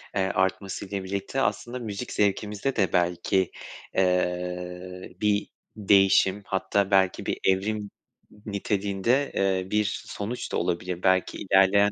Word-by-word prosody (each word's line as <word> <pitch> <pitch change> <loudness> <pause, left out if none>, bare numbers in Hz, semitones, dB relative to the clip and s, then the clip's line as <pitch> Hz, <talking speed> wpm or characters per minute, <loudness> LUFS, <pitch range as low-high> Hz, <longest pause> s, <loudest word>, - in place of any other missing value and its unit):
eee, 95 - +2
artmasıyla 95 +1 -1
birlikte 100 +7 -3
aslında 125 -1 -1
müzik 110 +1 -5
zevkimizde 105 +5 0
de 95 -5 +1
belki, 90 +1 +1 0.4
eee, 90 0 -1
bir 105 -1 +2 0.3
değişim 100 -1 +4
hatta 95 +1 0
belki 95 -1 +3
bir - - -2
evrim 100 +3 +1 0.5
n 105 - -19
niteliğinde, 105 +5 0
eee, 95 -1 0
bir 105 -1 0
sonuç 110 +5 -5
da - - 0
olabilir 90 +1 -2
belki 95 -1 +2
ilerleyen 100 +1 +4
95 Hz, 120 wpm, -26 LUFS, 95-105 Hz, 0.5 s, değişim